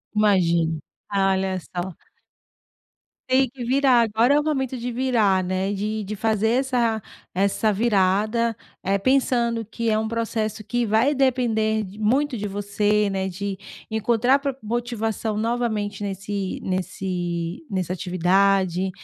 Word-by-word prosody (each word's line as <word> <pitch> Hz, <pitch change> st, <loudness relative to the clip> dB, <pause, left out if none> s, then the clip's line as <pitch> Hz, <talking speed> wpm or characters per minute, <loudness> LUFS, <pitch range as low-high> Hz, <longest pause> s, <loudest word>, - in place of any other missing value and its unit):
Imagino, 170 Hz, -6 st, +2 dB, 0.3 s
olha 190 Hz, -1 st, +1 dB
só. 175 Hz, +1 st, -5 dB, 1.4 s
Tem 260 Hz, -1 st, +3 dB
que 250 Hz, -1 st, -8 dB
virar, 260 Hz, -1 st, +4 dB
agora 230 Hz, +4 st, +3 dB
é 295 Hz, -, +5 dB
o -, -, -1 dB
momento 265 Hz, -4 st, -1 dB
de 245 Hz, +1 st, -4 dB
virar, 225 Hz, -7 st, +2 dB
né, 185 Hz, +2 st, -1 dB
de 210 Hz, +2 st, -2 dB
de 210 Hz, +2 st, -5 dB
fazer 220 Hz, 0 st, +1 dB
essa 240 Hz, -3 st, +1 dB, 0.3 s
essa 200 Hz, +3 st, +1 dB
virada, 215 Hz, +2 st, +2 dB, 0.3 s
eh, 195 Hz, +1 st, +1 dB
pensando 235 Hz, -1 st, +1 dB
que 230 Hz, +1 st, -3 dB
é 215 Hz, -, +2 dB
um 220 Hz, 0 st, -1 dB
processo 220 Hz, -1 st, -2 dB
que 240 Hz, +1 st, 0 dB
vai 225 Hz, +7 st, +2 dB
depender 225 Hz, -5 st, +1 dB
muito 255 Hz, +5 st, +1 dB
de 210 Hz, -, -4 dB
você, 205 Hz, +1 st, +1 dB
né, 190 Hz, 0 st, -2 dB
de 195 Hz, +1 st, -4 dB, 0.3 s
encontrar 235 Hz, +5 st, +2 dB
pro 275 Hz, -1 st, -2 dB
motivação 225 Hz, -2 st, -2 dB
novamente 220 Hz, -3 st, -1 dB
nesse 195 Hz, 0 st, -3 dB
nesse 180 Hz, -, -3 dB
nessa 185 Hz, -2 st, -2 dB
atividade. 185 Hz, +1 st, +2 dB
215 Hz, 130 wpm, -23 LUFS, 195-235 Hz, 1.4 s, é